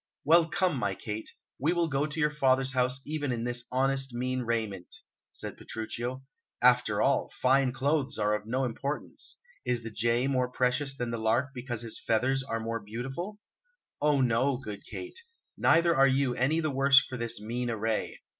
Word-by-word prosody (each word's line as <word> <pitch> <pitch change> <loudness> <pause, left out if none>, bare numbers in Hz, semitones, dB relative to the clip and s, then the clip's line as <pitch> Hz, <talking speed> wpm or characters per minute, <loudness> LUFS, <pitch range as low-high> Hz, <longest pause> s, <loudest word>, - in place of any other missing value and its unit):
"Well, 165 +2 +6
come, 180 -3 +1
my 100 -5 -1
Kate, 110 +2 -5 0.3
we 155 +6 +2
will 170 -1 +1
go 145 0 0
to 155 +1 -5
your 150 -1 +2
father's 135 -2 +2
house 130 +1 +1
even 145 -2 -2
in 115 -1 -2
this 120 0 -1
honest, 135 0 +1
mean 130 +1 -1
raiment," 110 -6 -3 0.4
said - - -6
Petruchio. 120 +3 -5 0.4
"After 125 -4 +4
all, 140 - +2
fine 130 0 +3
clothes 140 +2 0
are 105 -1 +1
of 105 0 -3
no 130 +3 0
importance. 140 +5 -4 0.2
Is 120 -2 -1
the 115 - -6
jay 115 +3 +1
more 130 -2 +1
precious 130 +2 0
than 120 -2 -2
the 115 - -3
lark 115 +5 +1
because 120 -3 -4
his 115 - -4
feathers 130 +4 +1
are 115 -4 -3
more 115 0 -3
beautiful? 135 - -6 0.6
Oh 145 -2 +3
no, 125 +2 +2
good 105 -6 -8
Kate; 360 +5 -7 0.4
neither 170 0 +4
are 135 0 +6
you 135 -1 +2
any 135 +7 +1
the 155 -2 -1
worse 135 +1 +6
for 130 - -6
this 115 -1 -1
mean 120 +3 -3
array. 110 -1 -2
130 Hz, 180 wpm, -29 LUFS, 115-140 Hz, 0.6 s, Well